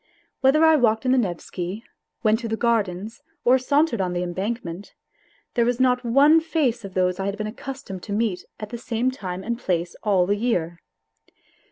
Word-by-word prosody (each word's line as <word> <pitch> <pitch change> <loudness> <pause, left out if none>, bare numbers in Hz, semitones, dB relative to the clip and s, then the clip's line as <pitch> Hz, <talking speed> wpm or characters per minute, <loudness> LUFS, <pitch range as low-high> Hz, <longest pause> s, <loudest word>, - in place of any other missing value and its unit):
Whether 290 +4 +5
I 320 -1 +6
walked 225 -2 +2
in 255 - +3
the 260 - +4
Nevsky, 185 0 -4 0.4
went 220 0 +3
to 235 - -4
the 225 0 -2
Gardens 220 -1 -1 0.2
or 255 +2 +5
sauntered 280 -3 +2
on 180 -1 -1
the 175 0 -1
embankment, 190 0 -4 0.6
there 235 - +2
was 245 +1 0
not 250 -1 +3
one 280 +7 +5
face 285 -8 0
of 195 -2 -9
those 180 0 +1
I 195 - -1
had 200 +1 -3
been 215 - -3
accustomed 215 -4 -7
to 205 - -8
meet 205 -4 0 0.2
at 215 - -6
the 235 +1 -6
same 240 +2 -1
time 185 -7 -6
and 235 +2 -3
place 175 -5 -1
all 195 -4 +3
the 200 +3 +1
year. 175 -7 -1
220 Hz, 190 wpm, -23 LUFS, 185-250 Hz, 0.6 s, I